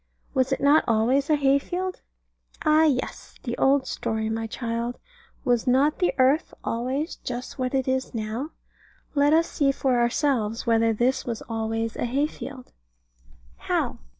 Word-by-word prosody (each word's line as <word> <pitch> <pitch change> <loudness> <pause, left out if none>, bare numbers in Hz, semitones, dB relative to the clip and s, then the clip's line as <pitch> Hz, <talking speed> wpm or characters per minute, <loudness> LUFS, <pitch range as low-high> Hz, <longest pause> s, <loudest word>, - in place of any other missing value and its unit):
Was 260 -1 +1
it 270 - +1
not 285 +3 +5
always 245 +6 +2
a 305 - +5
hay 280 -1 +3
field? 365 +4 -4 0.6
Ah, 310 +1 +5
yes; 265 -5 -2
the 240 -1 -3
old 270 0 +3
story, 220 0 -2
my 225 0 -2
child: 235 +1 -3 0.5
Was 245 -1 +1
not 275 +4 +3
the 360 - +3
earth 270 +5 +2
always 260 +8 -2
just 250 +2 -6
what 255 +1 -1
it 265 -1 0
is 260 -1 -1
now? 225 +6 -3 0.6
Let 290 0 +3
us 330 +2 +4
see 280 -3 +1
for 265 -2 +1
ourselves 235 -2 0
whether 230 -1 +3
this 240 +4 +1
was 230 -2 -3
always 225 0 -2
a - - -1
hay 270 +5 +1
field. 270 -4 -8 0.9
How? - - -1
255 Hz, 155 wpm, -25 LUFS, 230-285 Hz, 0.9 s, not